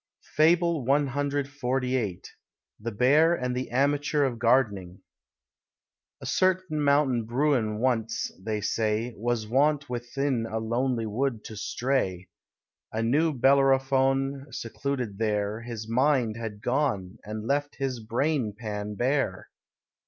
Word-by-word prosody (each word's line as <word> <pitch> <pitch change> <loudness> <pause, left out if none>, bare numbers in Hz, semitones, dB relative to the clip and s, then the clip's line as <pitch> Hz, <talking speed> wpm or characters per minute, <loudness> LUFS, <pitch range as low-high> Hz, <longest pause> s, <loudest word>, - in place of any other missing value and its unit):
FABLE 165 -1 +3
CXLVIII. 135 -5 0 0.6
THE 115 +2 -4
BEAR 145 +10 +4
AND 125 -4 -2
THE 130 +1 -3
AMATEUR 145 +3 +1
OF 125 -4 -1
GARDENING. 105 -7 +1 1.2
A - - -9
certain 185 -4 +1
Mountain 140 -5 +3
Bruin 120 -3 +1
once, 115 -2 0
they 105 0 -2
say, 110 +3 -1
Was 115 0 -1
wont 140 +4 +1
within 125 0 -1
a 110 - -2
lonely 120 +1 -1
wood 115 +1 -2
to 110 - -8
stray, 100 -5 -1 0.6
A 110 +1 -1
new 150 +8 +2
Bellerophon 135 0 +2
secluded 125 -3 -4
there, 105 0 -1
His 115 -2 -6
mind 125 -1 +2
had 110 -3 -6
gone, 120 -9 -1
and 105 +1 -6
left 145 +3 -1
his 135 -3 -2
brain 120 0 -1
pan 105 -2 -5
bare. 135 +5 -1
125 Hz, 115 wpm, -27 LUFS, 110-140 Hz, 1.2 s, BEAR